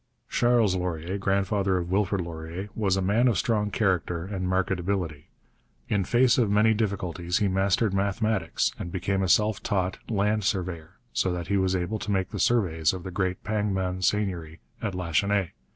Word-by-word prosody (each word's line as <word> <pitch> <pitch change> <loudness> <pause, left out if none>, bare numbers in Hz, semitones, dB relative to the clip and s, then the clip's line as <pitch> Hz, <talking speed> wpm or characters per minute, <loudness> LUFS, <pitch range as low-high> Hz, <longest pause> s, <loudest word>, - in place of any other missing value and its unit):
Charles 120 -5 +3
Laurier, 90 +1 -3
grandfather 95 0 +1
of 90 0 -3
Wilfrid 100 0 +1
Laurier, 85 +3 -6
was 100 -4 +1
a 95 - 0
man 110 +7 +3
of 115 -6 +2
strong 105 +4 +1
character 90 -5 0
and 95 -2 -3
marked 95 +1 +1
ability. 90 -5 -2 0.6
In 100 -3 +1
face 125 +3 +4
of 115 -4 +2
many 105 +2 +4
difficulties 90 -5 -1
he 105 - +2
mastered 95 +2 +1
mathematics 100 -2 0
and 85 - -5
became 95 +2 -1
a 95 - 0
self 105 +2 +3
taught 95 -3 -1
land 105 0 +1
surveyor, 90 -5 -2 0.2
so 95 - +1
that 85 0 -5
he 100 - +2
was 95 -1 +1
able 95 +4 -2
to - - -6
make 95 -2 0
the - - -4
surveys 85 -10 +2
of 90 -2 -6
the 95 - -6
great 95 0 -2
Pangman 95 -4 -1
seigneury 90 -6 -1 0.2
at 105 -4 -2
Lachenaie. 90 +2 0
95 Hz, 175 wpm, -26 LUFS, 90-105 Hz, 0.6 s, face